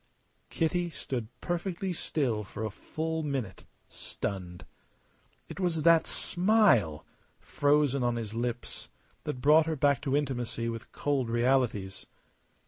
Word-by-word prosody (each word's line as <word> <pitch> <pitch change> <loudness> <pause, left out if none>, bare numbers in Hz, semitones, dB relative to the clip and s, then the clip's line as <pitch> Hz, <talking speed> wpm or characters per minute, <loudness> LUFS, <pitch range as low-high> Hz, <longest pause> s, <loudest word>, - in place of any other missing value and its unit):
Kitty 175 +2 0
stood 125 -7 -4
perfectly 180 +2 -2
still 125 -10 -1
for 110 +2 -5
a 110 - -3
full 160 +8 -3
minute, 135 - -3 0.2
stunned. 90 -3 -5 0.8
It - - -8
was 170 -4 0
that 165 0 +5
smile 175 - +3 0.3
frozen 145 -2 +2
on 120 -1 +1
his 110 -2 -4
lips 120 +1 -4 0.4
that 140 -4 -4
brought 155 +3 +6
her 160 - 0
back 140 -2 +2
to 140 -1 +1
intimacy 120 -5 -2
with 115 0 -6
cold 135 -5 -1
realities. 120 -5 +1
135 Hz, 125 wpm, -30 LUFS, 115-160 Hz, 0.8 s, brought